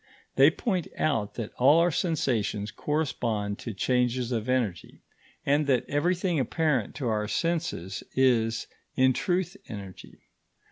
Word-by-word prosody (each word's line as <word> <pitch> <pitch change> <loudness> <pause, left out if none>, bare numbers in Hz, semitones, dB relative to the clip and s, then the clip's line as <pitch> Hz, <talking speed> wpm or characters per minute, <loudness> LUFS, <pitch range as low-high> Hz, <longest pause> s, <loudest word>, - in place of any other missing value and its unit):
They 135 +2 +7
point 180 +1 -2
out 115 -10 0
that 115 -3 -5
all 140 +5 +6
our 175 +1 +3
sensations 120 - -1
correspond 115 -9 -2
to 115 - -5
changes 125 +4 0
of 115 0 -2
energy, 115 -9 -2 0.4
and 145 +1 +2
that 130 -4 +2
everything 175 +3 +1
apparent 135 - 0
to 130 - -3
our 105 -2 0
senses 165 - -2
is, 115 -4 +2 0.3
in 130 0 +4
truth, 180 +5 -1
energy. 100 -4 -10
130 Hz, 130 wpm, -27 LUFS, 110-155 Hz, 0.4 s, They